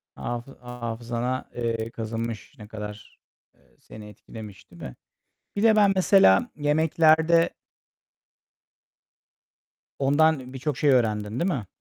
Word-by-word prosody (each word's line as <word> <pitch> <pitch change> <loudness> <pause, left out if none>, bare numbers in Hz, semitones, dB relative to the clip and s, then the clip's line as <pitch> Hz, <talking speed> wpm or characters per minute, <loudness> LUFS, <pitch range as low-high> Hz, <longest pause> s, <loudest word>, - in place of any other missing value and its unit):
Hafı 120 +3 -6
hafızana, 120 +1 -4
eee, 115 -1 -2
kazınmış. 115 -1 -5
Ne 105 -2 -11
kadar, 105 -1 -9 0.4
eee, - - -31
seni 105 -1 -12
etkilemiş, 105 -1 -12
değil 85 - -15
mi? 60 - -8 0.6
Bir 200 - -1
de 220 -1 +5
ben 205 -2 +5
mesela 185 - +4
yemeklerde 160 +2 +3 2.5
Ondan 140 -1 +2
birçok 135 +1 -3
şey 145 - +2
öğrendin, 110 -3 +1
değil 185 +2 0
mi? 115 - -4
120 Hz, 110 wpm, -25 LUFS, 110-155 Hz, 2.5 s, de